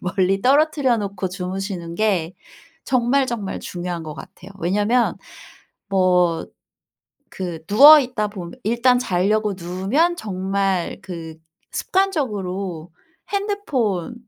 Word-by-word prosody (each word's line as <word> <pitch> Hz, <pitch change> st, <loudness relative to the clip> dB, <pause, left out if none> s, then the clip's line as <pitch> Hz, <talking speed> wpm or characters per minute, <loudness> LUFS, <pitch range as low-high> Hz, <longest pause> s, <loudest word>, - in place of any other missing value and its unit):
멀리 190 Hz, +2 st, +1 dB
떨어뜨려 280 Hz, -2 st, +3 dB
놓고 200 Hz, -2 st, -3 dB
주무시는 180 Hz, -2 st, -5 dB
게 190 Hz, -6 st, 0 dB, 0.5 s
정말, 260 Hz, +2 st, +2 dB
정말 220 Hz, -6 st, -4 dB
중요한 175 Hz, -1 st, -5 dB
거 155 Hz, -1 st, -7 dB
같아요. 185 Hz, -, -12 dB
왜냐하면 210 Hz, +8 st, +1 dB, 0.7 s
뭐 180 Hz, -4 st, +2 dB, 0.9 s
그 175 Hz, -4 st, -5 dB
누워있다 255 Hz, -2 st, +7 dB
보며 180 Hz, -4 st, -8 dB
일단 240 Hz, +3 st, +3 dB
자려고 205 Hz, 0 st, 0 dB
누우면 195 Hz, -, 0 dB
정말 195 Hz, -, -2 dB
그 165 Hz, -3 st, -8 dB, 0.4 s
습관적으로 200 Hz, -, -2 dB, 0.4 s
핸드폰을 285 Hz, -, -1 dB
195 Hz, 235 characters per minute, -21 LUFS, 180-245 Hz, 0.9 s, 누워있다